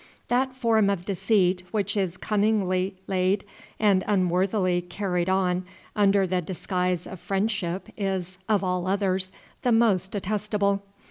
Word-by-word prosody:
That 255 +1 +1
form 225 -5 +3
of 185 -3 -1
deceit 190 -2 +2
which 205 -1 -1
is 185 -4 -1
cunningly 200 -3 +1
laid 190 +1 +1 0.3
and 200 -3 +4
unworthily 185 -1 +2
carried 180 -1 -2
on 185 -1 +1 0.3
under 200 -2 +4
the 180 0 0
disguise 180 0 -2
of 190 - -8
friendship 195 -2 -1
is, 190 -3 -3
of 210 -2 +3
all 180 -1 -1
others, 190 -1 0 0.3
the 245 - +2
most 215 -5 +3
detestable. 205 0 0
195 Hz, 130 wpm, -26 LUFS, 185-205 Hz, 0.3 s, and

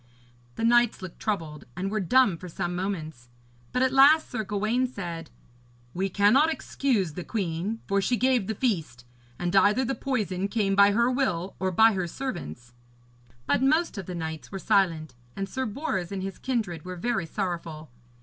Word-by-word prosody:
The - - -4
knights 240 -3 +3
looked 185 - -9
troubled, 165 -8 -3
and 195 +2 -2
were 215 - 0
dumb 210 0 +4
for 180 +2 -9
some 175 +1 -3
moments; 160 -10 -4 0.4
but 250 - +1
at 260 - +2
the - - -4
last 300 +4 +6
Sir 220 -3 -2
Gawaine 215 +5 0
said: 170 - -6 0.6
'We 190 +2 -1
cannot 225 - +4
excuse 230 - -1
the 180 - -6
queen, 195 +2 -3
for 200 0 +1
she 245 +6 +1
gave 250 -5 +2
the 220 - -2
feast. 165 - -2 0.3
And 175 +1 -2
either 210 +6 +4
the 270 - -1
poison 205 -9 -2
came 200 -2 0
by 200 0 +6
her 235 +3 +3
will 195 -9 -1
or 190 - 0
by 220 +5 +5
her 185 -2 -2
servants.' 120 - -6 0.7
But 145 - +1
most 310 +4 +2
of 195 -4 -6
the 180 - -5
knights 160 -2 -5
were 195 - -4
silent, 165 -7 +1 0.2
and 195 0 -3
Sir 260 +6 -3
Bors 205 - -3
and 190 -1 -4
his 195 -1 -6
kindred 215 - -2
were 185 0 -6
very 180 -2 -1
sorrowful. 165 - -4
195 Hz, 180 wpm, -27 LUFS, 175-240 Hz, 0.7 s, last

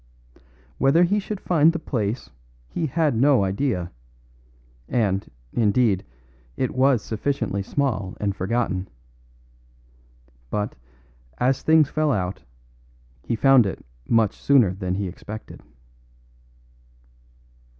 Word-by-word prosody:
Whether 140 +6 +4
he 200 +4 +2
should 205 0 -5
find 165 -4 +4
the 170 - -3
place 115 - -3 0.4
he 160 - -2
had 150 -1 +1
no 130 -1 +4
idea; 95 -2 -1 1.0
and, 100 -5 0 0.2
indeed, 105 -3 +2 0.5
it 130 - -1
was 130 -2 +3
sufficiently 115 -3 -2
small 105 -4 -2
and 100 -2 -1
forgotten. 95 -1 -1 1.6
But, 105 +4 -2 0.6
as 130 +1 +1
things 155 -2 +4
fell 155 -1 +1
out, 95 -5 -2 0.9
he 115 - 0
found 130 -2 +5
it 95 - -6 0.2
much 110 -3 +2
sooner 125 -10 +4
than 90 -1 -3
he 100 0 -2
expected. 105 +4 -9
115 Hz, 105 wpm, -23 LUFS, 100-140 Hz, 1.6 s, found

